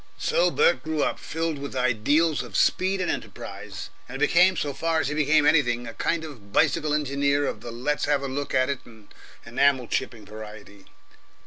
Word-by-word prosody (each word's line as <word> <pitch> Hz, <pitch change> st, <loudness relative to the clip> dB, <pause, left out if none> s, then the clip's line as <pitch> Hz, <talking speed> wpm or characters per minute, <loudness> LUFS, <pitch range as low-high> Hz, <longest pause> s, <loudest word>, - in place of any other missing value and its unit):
So -, -, +2 dB
Bert 475 Hz, +2 st, +3 dB
grew 155 Hz, -1 st, -1 dB
up, -, -, -1 dB
filled 160 Hz, -2 st, -3 dB
with 140 Hz, -1 st, -6 dB
ideals 130 Hz, +6 st, +2 dB
of 115 Hz, -6 st, -5 dB
speed 190 Hz, +1 st, +2 dB
and 180 Hz, -, 0 dB
enterprise, -, -, -7 dB, 0.2 s
and 130 Hz, -, -6 dB
became, 180 Hz, +5 st, +4 dB
so 145 Hz, -2 st, -2 dB
far 165 Hz, +3 st, 0 dB
as 145 Hz, -, 0 dB
he -, -, -2 dB
became 150 Hz, 0 st, +3 dB
anything, 120 Hz, -6 st, +3 dB
a 115 Hz, -, -7 dB
kind 170 Hz, -1 st, -1 dB
of 120 Hz, -11 st, -11 dB
bicycle 150 Hz, +4 st, +2 dB
engineer 140 Hz, 0 st, +1 dB
of -, -, -4 dB
the -, -, -7 dB
let's 125 Hz, +6 st, -1 dB
have 145 Hz, -1 st, +1 dB
a -, -, -2 dB
look 140 Hz, +2 st, -3 dB
at 130 Hz, 0 st, +3 dB
it 140 Hz, -, -3 dB
and 110 Hz, -3 st, -17 dB, 0.3 s
enamel 130 Hz, +1 st, +2 dB
chipping 110 Hz, -1 st, -3 dB
variety. 105 Hz, -1 st, -11 dB
140 Hz, 190 wpm, -25 LUFS, 120-155 Hz, 0.3 s, became